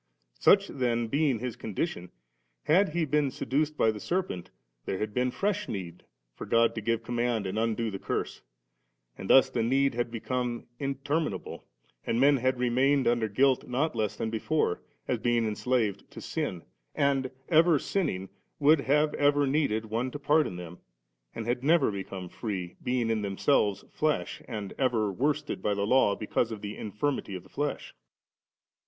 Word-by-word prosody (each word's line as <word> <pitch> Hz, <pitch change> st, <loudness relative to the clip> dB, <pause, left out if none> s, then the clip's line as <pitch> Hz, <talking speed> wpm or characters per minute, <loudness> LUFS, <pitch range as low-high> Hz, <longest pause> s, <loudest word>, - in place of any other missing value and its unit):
Such 200 Hz, 0 st, +5 dB
then 120 Hz, -3 st, -1 dB
being 140 Hz, -1 st, +2 dB
his 125 Hz, +1 st, -4 dB
condition, 95 Hz, -, -4 dB, 0.5 s
had 190 Hz, +6 st, +4 dB
he 170 Hz, -2 st, +2 dB
been 150 Hz, -1 st, +1 dB
se -, -, -6 dB
duced 150 Hz, +4 st, 0 dB
by 110 Hz, -, +4 dB
the 105 Hz, -, -7 dB
serpent, 175 Hz, -, -2 dB, 0.4 s
there 95 Hz, -, -2 dB
had 105 Hz, +1 st, -3 dB
been 125 Hz, +2 st, +1 dB
fresh 205 Hz, +8 st, -1 dB
need 90 Hz, -4 st, -6 dB, 0.3 s
for -, -, -8 dB
God 115 Hz, 0 st, +3 dB
to 110 Hz, -, -4 dB
give 115 Hz, +2 st, 0 dB
command 120 Hz, -3 st, -1 dB
and 95 Hz, +3 st, -2 dB
undo 115 Hz, 0 st, 0 dB
the 95 Hz, -, -5 dB
curse; -, -, -3 dB, 0.7 s
and 95 Hz, -, -8 dB
thus 135 Hz, 0 st, +6 dB
the 120 Hz, -, 0 dB
need 135 Hz, +4 st, +2 dB
had 120 Hz, 0 st, -1 dB
become 120 Hz, +1 st, -3 dB
inter 140 Hz, +2 st, -1 dB
minable 105 Hz, -, -4 dB
7, -, -, -30 dB, 0.5 s
and 115 Hz, -, +1 dB
men 140 Hz, +2 st, +5 dB
had 130 Hz, +1 st, +1 dB
remained 130 Hz, +3 st, +2 dB
under 120 Hz, -2 st, +2 dB
guilt 130 Hz, +5 st, +2 dB
not 135 Hz, +4 st, 0 dB
less 110 Hz, -3 st, -1 dB
than 110 Hz, -, -3 dB
before, 115 Hz, -, 0 dB, 0.3 s
as -, -, 0 dB
being 120 Hz, -1 st, +1 dB
enslaved 110 Hz, -1 st, -1 dB
to -, -, -10 dB
sin; 85 Hz, -3 st, -3 dB, 0.3 s
and, 135 Hz, -2 st, +1 dB, 0.2 s
ever 165 Hz, 0 st, +5 dB
sinning, 95 Hz, -, -2 dB, 0.3 s
would 150 Hz, +1 st, +5 dB
have 150 Hz, +3 st, +2 dB
ever 145 Hz, 0 st, +3 dB
needed 135 Hz, -6 st, +1 dB
one 115 Hz, +4 st, -2 dB
to 135 Hz, -, -6 dB
pardon 145 Hz, -, +2 dB
them, 90 Hz, 0 st, -8 dB, 0.6 s
and 115 Hz, -, -4 dB
had 120 Hz, +2 st, -1 dB
never 165 Hz, -3 st, +4 dB
become 95 Hz, -2 st, -6 dB
free, 95 Hz, -3 st, -5 dB
being 125 Hz, -2 st, 0 dB
in 110 Hz, -1 st, 0 dB
themselves 100 Hz, +1 st, +1 dB
flesh, 155 Hz, -1 st, -1 dB
and 105 Hz, -5 st, -5 dB
ever 115 Hz, -6 st, +1 dB
worsted 145 Hz, +7 st, -1 dB
by 105 Hz, -, 0 dB
the 100 Hz, 0 st, 0 dB
Law 110 Hz, -3 st, +4 dB
because 110 Hz, +2 st, -1 dB
of 110 Hz, -2 st, -6 dB
the 105 Hz, 0 st, -5 dB
infirmity 105 Hz, 0 st, -3 dB
of 90 Hz, -, -7 dB
the -, -, -19 dB
flesL 145 Hz, 0 st, -1 dB
69. -, -, -19 dB
120 Hz, 175 wpm, -28 LUFS, 110-145 Hz, 0.7 s, thus